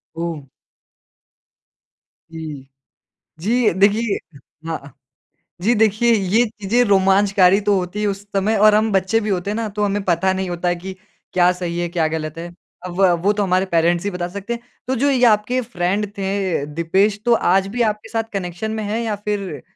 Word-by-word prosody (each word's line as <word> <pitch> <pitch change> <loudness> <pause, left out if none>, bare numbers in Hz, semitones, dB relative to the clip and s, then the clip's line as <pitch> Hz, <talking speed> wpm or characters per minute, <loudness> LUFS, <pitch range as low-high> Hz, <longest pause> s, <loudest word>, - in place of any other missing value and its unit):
ओह! 165 -4 -5 1.8
जी। 155 -4 -8 0.7
जी, 225 +6 +2
देखिए 205 +3 +2 0.5
हाँ। 160 - -2
अ, 140 - -12 0.7
जी 230 +5 +3
देखिए 220 +2 +3
ये 210 +2 +2
चीज़ें 215 +2 0
रोमांचकारी 195 -1 +4
तो 205 0 +2
होती 180 +3 -4
है 210 - +1
उस 200 -1 -3
समय 205 +3 +1
और 210 +1 +6
हम 215 +1 +2
बच्चे 195 +3 +2
भी 215 -1 -3
होते 190 0 -1
हैं 210 - -2
ना 225 -1 -2
तो 210 - 0
हमें 205 0 0
पता 185 +2 +2
नहीं 190 -1 -3
होता 175 0 -3
है 175 - +1
कि 185 +2 -7 0.4
क्या 180 0 +4
सही 175 -1 -4
है 175 - -1
क्या 165 -2 0
गलत 155 0 -4
है? 170 - -5 0.4
अ, 180 - -5
व 180 +1 +3
वो 205 - +3
तो 210 0 0
हमारे 185 0 +1
पेरेंट्स 170 -1 +1
ही 205 - -1
बता 180 -1 -3
सकते 200 +5 -5
हैं। 235 - -6 0.3
तो 260 - 0
जो 280 +4 +2
ये 255 -3 +1
आपके 230 +3 +2
फ्रेंड 205 -1 -2
थे 195 -4 -1
अ, - - -4
दीपेश 170 +7 0
तो 240 - +4
आज 195 -3 +2
भी 245 - 0
आपके 210 0 -12
साथ 225 -1 -1
कनेक्शन 185 +2 -4
में 220 0 -3
हैं? 210 +2 -2
या 220 -2 -2
फ़िर 200 -8 -4
195 Hz, 195 wpm, -20 LUFS, 175-210 Hz, 1.8 s, और